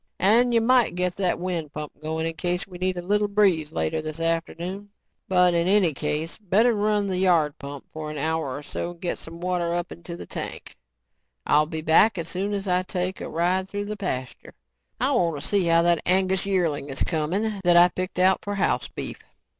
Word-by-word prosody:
"And 230 Hz, +6 st, +4 dB
you 230 Hz, -1 st, +3 dB
might 245 Hz, -4 st, +3 dB
get 180 Hz, 0 st, -1 dB
that 185 Hz, -3 st, +1 dB
wind 175 Hz, -4 st, -3 dB
pump 150 Hz, -1 st, -6 dB
going 160 Hz, +1 st, -2 dB
in 165 Hz, -, -2 dB
case 175 Hz, +2 st, -1 dB
we 180 Hz, -2 st, -11 dB
get 185 Hz, 0 st, -1 dB
a 175 Hz, -, -4 dB
little 205 Hz, +3 st, +1 dB
breeze 190 Hz, -7 st, +2 dB
later 160 Hz, 0 st, -1 dB
this 155 Hz, +1 st, -6 dB
afternoon. 170 Hz, +4 st, -2 dB, 0.4 s
But 180 Hz, -1 st, +4 dB
in 170 Hz, 0 st, +1 dB
any 190 Hz, -5 st, +4 dB
case, 150 Hz, +5 st, -3 dB
better 215 Hz, +5 st, +3 dB
run 210 Hz, -1 st, +1 dB
the 185 Hz, -2 st, -1 dB
yard 170 Hz, -6 st, +2 dB
pump 140 Hz, -1 st, -8 dB
for 155 Hz, -1 st, -5 dB
an 150 Hz, -, -6 dB
hour 155 Hz, -2 st, -1 dB
or 145 Hz, -, -8 dB
so 170 Hz, -, -4 dB
and 175 Hz, -1 st, -11 dB
get 175 Hz, -, -3 dB
some 165 Hz, +1 st, -10 dB
water 175 Hz, -1 st, -1 dB
up 175 Hz, 0 st, -3 dB
into 170 Hz, 0 st, -8 dB
the -, -, -8 dB
tank. -, -, -7 dB, 0.7 s
I'll 150 Hz, +1 st, +3 dB
be 160 Hz, 0 st, -4 dB
back 175 Hz, +7 st, +4 dB
as 165 Hz, -1 st, -4 dB
soon 195 Hz, +4 st, -2 dB
as 200 Hz, 0 st, -4 dB
I 180 Hz, 0 st, +2 dB
take 185 Hz, 0 st, -3 dB
a -, -, -5 dB
ride 185 Hz, +3 st, 0 dB
through 205 Hz, 0 st, -4 dB
the 210 Hz, +1 st, -4 dB
pasture. 130 Hz, -11 st, -5 dB, 0.4 s
I -, -, +1 dB
want 165 Hz, -4 st, +1 dB
to -, -, -4 dB
see 200 Hz, -3 st, +2 dB
how 165 Hz, 0 st, +4 dB
that 170 Hz, -1 st, +3 dB
Angus 190 Hz, +1 st, +2 dB
yearling 165 Hz, -7 st, 0 dB
is 135 Hz, -, -1 dB
coming 190 Hz, +6 st, -1 dB
that 175 Hz, -1 st, +5 dB
I 175 Hz, +1 st, +8 dB
picked 185 Hz, +1 st, -5 dB
out 185 Hz, +1 st, +4 dB
for 205 Hz, 0 st, -3 dB
house 200 Hz, -, 0 dB
beef." -, -, -6 dB
175 Hz, 215 wpm, -25 LUFS, 160-195 Hz, 0.7 s, I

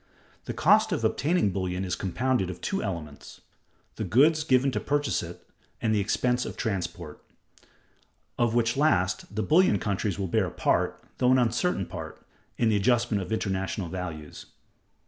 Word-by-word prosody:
The -, -, -4 dB
cost 215 Hz, +5 st, +4 dB
of 155 Hz, -10 st, -1 dB
obtaining 140 Hz, -, +1 dB
bullion 95 Hz, 0 st, -2 dB
is 90 Hz, -, -2 dB
compounded 110 Hz, +1 st, -1 dB
of 90 Hz, -, -7 dB
two 195 Hz, -, -2 dB
elements; 80 Hz, -8 st, -6 dB, 0.6 s
the -, -, -2 dB
goods 155 Hz, +6 st, +4 dB
given 135 Hz, -2 st, +3 dB
to -, -, -1 dB
purchase 145 Hz, 0 st, 0 dB
it -, -, -10 dB, 0.3 s
and 110 Hz, -2 st, 0 dB
the 105 Hz, -, +2 dB
expense 125 Hz, +4 st, +1 dB
of -, -, -7 dB
transport; 90 Hz, -6 st, -4 dB, 1.1 s
of 120 Hz, -1 st, +1 dB
which 115 Hz, -1 st, +2 dB
last, 105 Hz, -9 st, +1 dB
the 110 Hz, -, 0 dB
bullion 165 Hz, -, +4 dB
countries 100 Hz, -1 st, -2 dB
will 100 Hz, -, -2 dB
bear 90 Hz, -, +1 dB
a -, -, -6 dB
part -, -, 0 dB, 0.2 s
(though 125 Hz, 0 st, +4 dB
an 130 Hz, -, +5 dB
uncertain 120 Hz, -, +1 dB
part) -, -, -9 dB, 0.3 s
in 115 Hz, -, +2 dB
the 110 Hz, -, +2 dB
adjustment 115 Hz, 0 st, +2 dB
of 90 Hz, -, -7 dB
international 95 Hz, -3 st, -2 dB
values. 80 Hz, -4 st, -7 dB
110 Hz, 165 wpm, -27 LUFS, 95-130 Hz, 1.1 s, an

